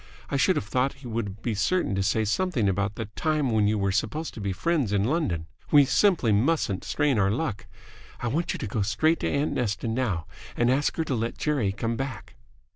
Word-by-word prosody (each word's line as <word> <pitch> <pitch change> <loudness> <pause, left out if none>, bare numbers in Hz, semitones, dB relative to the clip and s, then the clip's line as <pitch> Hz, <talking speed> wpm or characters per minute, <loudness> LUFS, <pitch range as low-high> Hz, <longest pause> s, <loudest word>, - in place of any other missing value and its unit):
I - - 0
should - - +3
have - - -1
thought 130 +5 0
he - - -5
would 110 -2 -4
be 120 - 0
certain 105 - +1
to 95 - 0
say 110 +3 +1
something 125 - +1
about 100 +2 0
the 110 - -4
time 155 -5 0
when 110 -2 +3
you 105 +1 +1
were 100 -1 +1
supposed 150 +10 -2
to 110 - -8
be 100 -1 -1
friends 140 - 0
in 100 -1 +2
London. 110 - 0 0.2
We 145 -2 +7
simply 170 - +3
mustn't 110 - +1
strain 145 -6 +1
our 95 -1 +3
luck. 110 -2 -2 0.5
I 120 - -2
want 160 +8 0
you - - -3
to - - -4
go 105 +2 -2
straight 155 - +2
to - - -1
aunt 140 +2 0
Nesta 115 -1 -1
now 110 -8 -1 0.3
and 120 +1 +3
ask 140 +3 +1
her 165 - +1
to 150 - -2
let 115 -1 -2
Jerry 140 -10 0
come 115 +3 -2
back." 130 -8 -5
115 Hz, 220 wpm, -26 LUFS, 100-145 Hz, 0.5 s, We